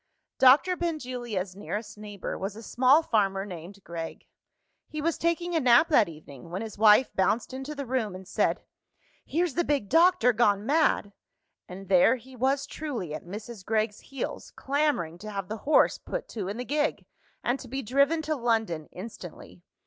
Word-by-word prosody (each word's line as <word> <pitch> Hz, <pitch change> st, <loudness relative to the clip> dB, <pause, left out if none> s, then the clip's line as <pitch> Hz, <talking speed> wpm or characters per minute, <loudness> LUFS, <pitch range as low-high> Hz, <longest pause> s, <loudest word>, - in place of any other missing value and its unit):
Doctor 280 Hz, +8 st, +6 dB
Benjulia's 245 Hz, -, -3 dB
nearest 210 Hz, +2 st, -5 dB
neighbour 205 Hz, -2 st, -6 dB
was 195 Hz, +1 st, -4 dB
a 225 Hz, -, -10 dB
small 260 Hz, +8 st, +4 dB
farmer 195 Hz, -6 st, +1 dB
named 185 Hz, +1 st, -10 dB
Gregg. 165 Hz, -1 st, -7 dB, 0.6 s
He 305 Hz, -, -6 dB
was 330 Hz, +2 st, 0 dB
taking 340 Hz, +1 st, -1 dB
a -, -, +4 dB
nap 250 Hz, +4 st, +5 dB
that 230 Hz, -, +4 dB
evening, 150 Hz, -1 st, -12 dB
when 185 Hz, +5 st, -4 dB
his 220 Hz, -2 st, -7 dB
wife 215 Hz, +4 st, +5 dB
bounced 215 Hz, +6 st, +1 dB
into 270 Hz, +3 st, -6 dB
the 280 Hz, -1 st, -5 dB
room, 235 Hz, -6 st, -2 dB
and 185 Hz, 0 st, -10 dB
said, -, -, 0 dB, 0.6 s
"Here's 335 Hz, +1 st, -1 dB
the 345 Hz, -, +1 dB
big 280 Hz, -10 st, -1 dB
doctor 335 Hz, -6 st, +5 dB
gone 210 Hz, -3 st, +2 dB
mad!" 285 Hz, -7 st, +2 dB, 0.5 s
And 190 Hz, +2 st, -9 dB
there 190 Hz, +6 st, +5 dB
he 260 Hz, +1 st, -13 dB
was 270 Hz, +3 st, +1 dB
truly, 265 Hz, -, -5 dB
at 155 Hz, -, -7 dB
Mrs. 210 Hz, +2 st, -8 dB
Gregg's 215 Hz, 0 st, -1 dB
heels, 275 Hz, -, -6 dB
clamouring 270 Hz, -, -1 dB
to 215 Hz, +3 st, -8 dB
have 195 Hz, -2 st, -5 dB
the 220 Hz, -, -3 dB
horse -, -, +4 dB
put -, -, -5 dB
to 205 Hz, -5 st, -4 dB
in 205 Hz, +3 st, -4 dB
the 250 Hz, -, -4 dB
gig, 295 Hz, +2 st, -1 dB, 0.4 s
and 245 Hz, +3 st, 0 dB
to 255 Hz, -, -10 dB
be 270 Hz, +3 st, -4 dB
driven 280 Hz, +7 st, +2 dB
to 310 Hz, 0 st, -1 dB
London 225 Hz, -, -1 dB
instantly. 180 Hz, -3 st, -10 dB
230 Hz, 175 wpm, -27 LUFS, 195-280 Hz, 0.6 s, Doctor